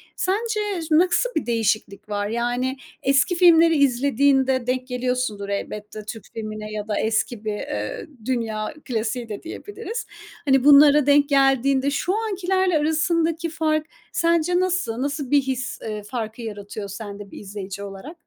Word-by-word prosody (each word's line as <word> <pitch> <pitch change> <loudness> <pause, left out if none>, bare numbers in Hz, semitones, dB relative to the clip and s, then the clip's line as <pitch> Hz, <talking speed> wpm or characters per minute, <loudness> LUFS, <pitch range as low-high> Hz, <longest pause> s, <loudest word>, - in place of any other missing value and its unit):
Sence 415 -2 -1
ş 320 - -6
nasıl 355 +9 +4
bir - - 0
değişiklik 215 -3 -1
var? 205 0 -1
Yani, 245 +4 -1 0.3
eski 275 +6 +3
filmleri 335 -2 +6
izlediğinde 265 -1 +2
denk 255 0 -1
geliyorsundur 250 -5 -2
elbette. 210 +1 -5
Türk 220 0 -7
filmine 215 -1 -6
ya 210 0 -5
da 210 - -1
eski 220 0 -1
bir, 210 - -1
eee, 105 - -4 0.2
dünya 225 -2 -2
klasiği 230 -1 -2
de 210 - -6
diyebiliriz. 425 +6 -6 0.4
Hani, 270 -2 +4
bunlara 290 0 +7
denk 285 0 +4
geldiğinde 270 0 +3
şu 345 +6 0
ankilerle 380 -5 +1
arasındaki 320 +2 +1
fark 310 -1 0 0.3
sence 335 +1 +2
nasıl? 360 -11 0
Nasıl 285 -1 -3
bir 285 - +5
his, 260 -1 -3
eee, 210 -1 -5
farkı 225 +1 -5
yaratıyor 205 -2 -6
sende 205 -1 -8
bir - - -9
izleyici 200 -1 -7
olarak? 200 - -9
260 Hz, 145 wpm, -23 LUFS, 215-320 Hz, 0.4 s, bunlara